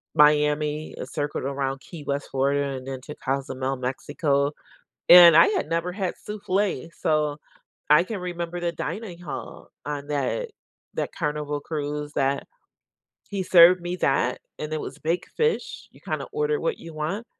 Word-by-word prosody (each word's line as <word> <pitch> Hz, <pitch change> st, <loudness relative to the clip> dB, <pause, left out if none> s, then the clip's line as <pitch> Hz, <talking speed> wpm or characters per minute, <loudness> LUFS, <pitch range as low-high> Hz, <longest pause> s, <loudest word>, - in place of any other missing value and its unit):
Miami, 150 Hz, 0 st, +3 dB
it -, -, -6 dB
circled 145 Hz, -2 st, -2 dB
around 135 Hz, -1 st, -2 dB
Key 160 Hz, -4 st, -10 dB
West, 140 Hz, 0 st, -2 dB
Florida, 140 Hz, +1 st, +1 dB
and 130 Hz, -, -9 dB
then 135 Hz, -1 st, -4 dB
to 150 Hz, -, -8 dB
Cozumel, 135 Hz, -1 st, -2 dB
Mexico, 140 Hz, +3 st, 0 dB, 0.6 s
and 175 Hz, -2 st, +10 dB
I -, -, +8 dB
had 420 Hz, -, -1 dB
never 170 Hz, +2 st, -1 dB
had 190 Hz, -2 st, -2 dB
souffle, 195 Hz, -6 st, -1 dB
so, 150 Hz, -2 st, +1 dB, 0.5 s
I 150 Hz, +3 st, +7 dB
can 205 Hz, 0 st, -5 dB
remember 175 Hz, -1 st, -4 dB
the 170 Hz, -1 st, -1 dB
dining 175 Hz, +3 st, -5 dB
hall 160 Hz, -5 st, -8 dB, 0.2 s
on 145 Hz, -1 st, -4 dB
that 150 Hz, -, -1 dB, 0.5 s
that -, -, -2 dB
Carnival 150 Hz, -2 st, -2 dB
cruise 150 Hz, -1 st, -4 dB
that 140 Hz, 0 st, 0 dB, 0.8 s
he 195 Hz, -2 st, -2 dB
served 180 Hz, 0 st, +7 dB
me 175 Hz, +1 st, -3 dB
that, 135 Hz, -4 st, +1 dB, 0.2 s
and 150 Hz, 0 st, -5 dB
it 155 Hz, -, -1 dB
was -, -, -7 dB
baked 165 Hz, +3 st, -2 dB
fish 465 Hz, +1 st, -1 dB
you -, -, -19 dB
kinda -, -, -3 dB
order 450 Hz, 0 st, 0 dB
what 485 Hz, -4 st, -1 dB
you 165 Hz, -, -10 dB
want, 165 Hz, +10 st, -3 dB
150 Hz, 160 wpm, -25 LUFS, 140-180 Hz, 0.8 s, and